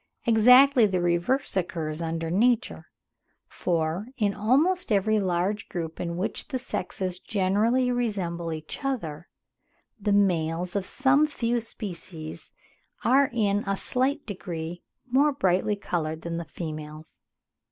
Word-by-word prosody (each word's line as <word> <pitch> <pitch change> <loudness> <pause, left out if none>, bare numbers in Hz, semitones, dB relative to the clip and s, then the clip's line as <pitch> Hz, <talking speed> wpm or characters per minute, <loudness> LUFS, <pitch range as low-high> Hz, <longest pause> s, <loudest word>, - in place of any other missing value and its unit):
Exactly 250 +2 +7
the 185 -2 0
reverse 175 +11 0
occurs 165 -4 -2
under 165 0 -3
nature; 240 +5 +1 0.6
for, 170 +4 -1
in 205 -3 +1
almost 275 - +2
every 215 +1 +3
large 190 +3 -1
group 165 -2 -5
in 170 -1 -3
which 185 - -2
the 265 - -2
sexes 185 -6 -4
generally 220 +7 +1
resemble 185 -9 -2
each 155 - -6
other, 175 - -3 0.7
the 205 0 0
males 175 -3 +1
of 195 -2 -1
some 280 +2 +3
few 240 -5 -1
species 175 -8 -7 0.5
are 270 +3 +4
in 205 -3 +1
a 195 0 0
slight 270 +7 0
degree 175 -4 -6 0.2
more 270 +4 +3
brightly 190 -5 +1
coloured 160 -5 -3
than 170 0 -3
the 170 - -4
females. 155 -1 -8
195 Hz, 125 wpm, -26 LUFS, 170-240 Hz, 0.7 s, Exactly